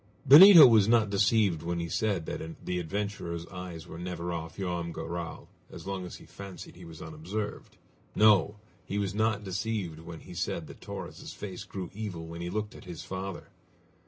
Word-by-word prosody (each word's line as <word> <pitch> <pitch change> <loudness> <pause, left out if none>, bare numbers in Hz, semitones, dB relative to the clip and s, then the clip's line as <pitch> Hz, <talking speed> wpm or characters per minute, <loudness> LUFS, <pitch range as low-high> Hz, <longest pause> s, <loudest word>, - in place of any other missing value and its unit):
Benito 165 +3 +11
was 110 -5 +6
not 110 -3 +3
deceived 100 -4 +2
when 85 0 -2
he 85 - -3
said 95 -1 -1
that 80 +1 -7
the 90 0 -1
adventurer's 85 -1 -4
eyes 90 -3 -8
were 80 - -9
never 90 -1 -4
off 80 -1 -6
Joam 90 -3 -3
Garral 85 0 -6 0.2
as - - -10
long 95 -2 -4
as - - -9
he - - -13
fancied 100 -3 -10
he 90 0 -12
was 80 -1 -10
unobserved. 85 +7 -6 0.4
No! 105 -1 +5 0.3
he 100 - -4
was 100 -2 -1
not 110 0 0
deceived 95 -3 -3
when 80 0 -9
he 90 - -11
said 85 -1 -3
that - - -13
Torres' - - -8
face 95 -3 -7
grew 95 -3 -6
evil 100 -6 -5
when 85 +1 -8
he 85 - -3
looked 105 +2 -3
at - - -13
his 85 -4 -8
father! 95 0 -6
90 Hz, 185 wpm, -29 LUFS, 85-105 Hz, 0.4 s, Benito